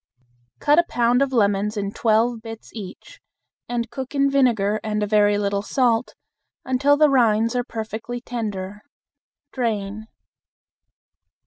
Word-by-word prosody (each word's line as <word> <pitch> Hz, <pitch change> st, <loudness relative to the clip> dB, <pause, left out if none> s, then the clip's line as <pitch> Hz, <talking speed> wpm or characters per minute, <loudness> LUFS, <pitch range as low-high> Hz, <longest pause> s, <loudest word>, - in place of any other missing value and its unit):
Cut 295 Hz, -, +3 dB
a -, -, +5 dB
pound 240 Hz, +1 st, +2 dB
of 275 Hz, -1 st, +1 dB
lemons 210 Hz, -2 st, +1 dB
in 200 Hz, -1 st, -2 dB
twelve 225 Hz, +2 st, +1 dB
bits 225 Hz, -1 st, -10 dB
each, 225 Hz, -, -10 dB, 0.5 s
and 235 Hz, -1 st, -3 dB
cook 265 Hz, +1 st, -6 dB
in 275 Hz, 0 st, +2 dB
vinegar 225 Hz, -6 st, +2 dB
and 210 Hz, -1 st, -1 dB
a -, -, +1 dB
very 205 Hz, 0 st, +3 dB
little 200 Hz, -1 st, -1 dB
salt 235 Hz, +1 st, 0 dB, 0.5 s
until 275 Hz, +3 st, +3 dB
the 305 Hz, 0 st, +5 dB
rinds 230 Hz, -3 st, +2 dB
are 245 Hz, -, +1 dB
perfectly 225 Hz, +1 st, -6 dB
tender. 210 Hz, -5 st, -5 dB, 0.7 s
Drain. 215 Hz, -3 st, -3 dB
225 Hz, 130 wpm, -22 LUFS, 210-250 Hz, 0.7 s, a